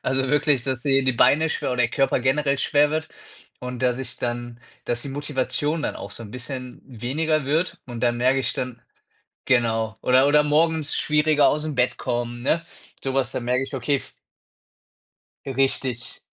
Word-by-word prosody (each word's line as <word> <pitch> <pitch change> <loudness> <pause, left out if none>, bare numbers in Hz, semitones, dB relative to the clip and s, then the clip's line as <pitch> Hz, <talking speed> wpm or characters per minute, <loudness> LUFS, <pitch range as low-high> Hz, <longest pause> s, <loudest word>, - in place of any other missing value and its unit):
also 130 0 0
wirklich, 145 -3 +2
dass 130 -2 -2
die 135 -2 +3
die 130 - +3
Beine 155 +6 +4
schwer - - -2
oder 125 - -2
der 115 -1 +3
Körper 135 0 +2
generell 140 +2 +2
schwer 145 0 +3
wird 155 +1 -2 0.5
und, 125 0 -6
dass 125 -1 +2
ich 130 -2 -6
dann 120 0 -4 0.3
dass 120 0 -1
die 140 - -6
Motivation 145 +2 -1
dann - - -2
auch - - -8
so 115 - -9
'n 105 - -10
bisschen 125 +1 -6
weniger 140 +5 -1
wird 160 +6 0
und 120 -2 -7
dann 120 -1 +2
merke 130 +2 +3
ich 130 - -1
dann 125 -2 -4 0.7
genau. 115 -4 +1
Oder 130 +2 +5
oder 150 +1 +5
morgens 155 +1 +1
schwieriger 150 0 +3
aus'm 150 0 -1
Bett 125 0 +1
kommen, 120 -1 -3
ne? 165 +6 +1 0.4
So 135 -1 -2
was, 135 -1 0
da - - -2
merke 125 +2 0
ich: 135 +1 -6
„Okay, 135 +3 +1
f“ - - -9 1.3
Richtig. 130 -3 -1
130 Hz, 180 wpm, -23 LUFS, 125-145 Hz, 1.3 s, Oder